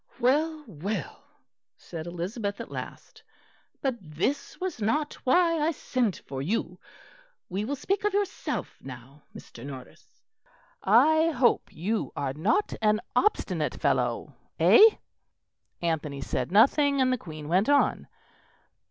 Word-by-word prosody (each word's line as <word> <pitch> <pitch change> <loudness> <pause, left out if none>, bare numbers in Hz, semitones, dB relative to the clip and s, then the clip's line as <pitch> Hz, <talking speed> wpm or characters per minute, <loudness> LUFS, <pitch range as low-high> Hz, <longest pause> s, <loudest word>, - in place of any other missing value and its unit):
"Well, 305 +5 +1
well," 200 - -5 0.6
said 165 -1 -8
Elizabeth 200 +4 -4
at - - -7
last, - - -8 0.6
"but 265 -3 0
this 180 - -3
was 365 -10 -4
not 295 +9 0
why 335 +4 +3
I 300 +2 +2
sent 250 - -1
for 135 -1 -5
you. 180 +2 -2 0.7
We 195 +3 -2
will 285 +5 -2
speak 385 +9 -2
of 415 - +2
yourself 400 -1 -3
now, 135 +2 -11
Mr. 115 - -11
Norris. 135 -2 -11 0.6
I 315 +10 +5
hope 255 -6 +2
you 210 +8 -2
are 140 -2 -2
not 205 - +1
an 215 0 +3 0.2
obstinate 420 +12 +1
fellow. - - 0 0.3
Eh?" - - +7 1.0
Anthony 150 -4 -2
said - - -3
nothing, 280 +7 +4
and 255 -1 +3
the - - 0
Queen 155 -5 -9
went 185 - +2
on. 285 -1 +2
220 Hz, 125 wpm, -27 LUFS, -, 1.0 s, Eh